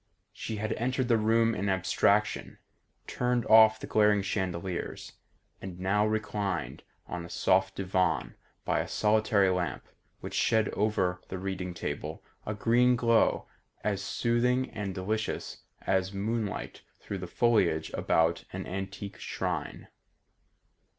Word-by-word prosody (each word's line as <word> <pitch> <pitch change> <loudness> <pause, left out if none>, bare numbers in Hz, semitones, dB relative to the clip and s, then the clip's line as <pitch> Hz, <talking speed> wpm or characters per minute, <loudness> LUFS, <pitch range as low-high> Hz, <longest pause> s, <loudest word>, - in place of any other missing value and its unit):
She 110 - -5
had 110 +1 -2
entered 130 +2 -1
the 115 - +5
room 115 +1 +3
in 100 -1 -1
abstraction, 95 +2 +1 0.5
turned 125 -1 0
off 110 0 +7
the - - -6
glaring 105 -2 +3
chandeliers, 95 -2 -3 0.5
and 90 -2 -7
now 105 +3 +2
reclined 105 -4 -2 0.2
on 90 -1 -5
a 85 - -9
soft 95 +2 +2
divan 95 -1 0 0.3
by - - +1
a - - -2
solitary 105 -2 +3
lamp 90 -1 -2 0.4
which - - -7
shed 110 -2 +2
over 95 -4 0
the 95 - -5
reading 90 -1 -4
table 75 -1 -5 0.2
a 105 - -2
green 120 +4 +3
glow 115 -1 +2 0.4
as 100 -2 -1
soothing 125 +4 +1
and 100 -3 -4
delicious 110 +4 -3 0.2
as 95 0 +1
moonlight 105 +1 -3 0.2
through 100 - -5
the 90 - -6
foliage 105 -7 +2
about 80 +1 +1
an - - -5
antique 95 +2 -6
shrine. - - -4
100 Hz, 130 wpm, -29 LUFS, 95-110 Hz, 0.5 s, off